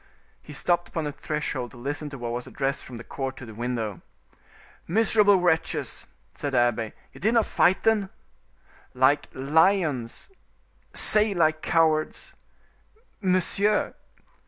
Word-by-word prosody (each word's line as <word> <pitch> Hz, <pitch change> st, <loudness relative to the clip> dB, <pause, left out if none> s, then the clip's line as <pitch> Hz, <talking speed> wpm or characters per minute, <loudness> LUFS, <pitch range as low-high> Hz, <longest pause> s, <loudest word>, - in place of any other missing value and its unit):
He -, -, -13 dB
stopped 175 Hz, +4 st, 0 dB
upon 165 Hz, -, -4 dB
the 150 Hz, -, -3 dB
threshold 145 Hz, -3 st, -4 dB
to 120 Hz, -, -15 dB
listen 145 Hz, +4 st, -4 dB
to 140 Hz, -, -8 dB
what 120 Hz, -2 st, -5 dB
was 120 Hz, +1 st, -5 dB
addressed 135 Hz, 0 st, -3 dB
from 125 Hz, -, -10 dB
the 115 Hz, -, -9 dB
court 135 Hz, +1 st, -5 dB
to 125 Hz, -, -9 dB
the 110 Hz, -, -10 dB
window. 115 Hz, -4 st, -4 dB, 0.9 s
"Miserable 210 Hz, +1 st, +4 dB
wretches!" 160 Hz, -3 st, -1 dB, 0.3 s
said 145 Hz, -1 st, -4 dB
the -, -, +2 dB
abbe, 120 Hz, -2 st, +1 dB, 0.2 s
"you -, -, -13 dB
did 220 Hz, +5 st, +2 dB
not 230 Hz, -, +4 dB
fight, 185 Hz, -, +2 dB
then?" 215 Hz, -3 st, +2 dB, 0.9 s
"Like 130 Hz, +3 st, +3 dB
lions." 150 Hz, -, +1 dB, 0.7 s
"Say 215 Hz, -1 st, +6 dB
like 155 Hz, -2 st, +2 dB
cowards." 160 Hz, -2 st, 0 dB, 0.9 s
"Monsieur!" 195 Hz, +2 st, +2 dB
150 Hz, 135 wpm, -25 LUFS, 125-180 Hz, 0.9 s, Say